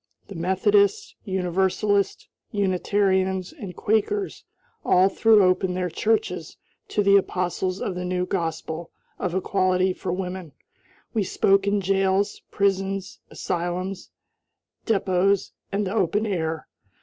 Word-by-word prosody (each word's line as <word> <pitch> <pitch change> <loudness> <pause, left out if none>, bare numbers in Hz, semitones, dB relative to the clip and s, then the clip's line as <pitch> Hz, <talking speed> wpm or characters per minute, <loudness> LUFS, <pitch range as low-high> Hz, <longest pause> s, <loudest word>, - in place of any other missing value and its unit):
The 200 - -8
Methodists, 405 - +2
Universalists, 190 +1 0 0.2
Unitarians, 190 -1 +1
and 205 - -8
Quakers 375 - 0 0.4
all 185 +2 +4
threw 215 0 +5
open 185 0 +2
their 180 -1 -2
churches 220 +6 -1 0.3
to 205 - 0
the 200 0 +6
apostles 185 0 -1
of 190 - -2
the 180 0 -4
new 180 0 -1
gospel 165 -2 -3 0.3
of 180 -1 -2
equality 185 -1 +1
for 180 - -4
women. 180 -3 -4 0.6
We 220 -3 +1
spoke 195 +1 +2
in 200 0 +2
jails, 195 +1 +1
prisons, 195 -1 -1
asylums, 180 +2 -3 0.8
depots, 195 -2 +2 0.2
and 200 +1 0
the 190 - -3
open 210 +1 +1
air. 160 -6 -2
190 Hz, 115 wpm, -24 LUFS, 180-200 Hz, 0.8 s, the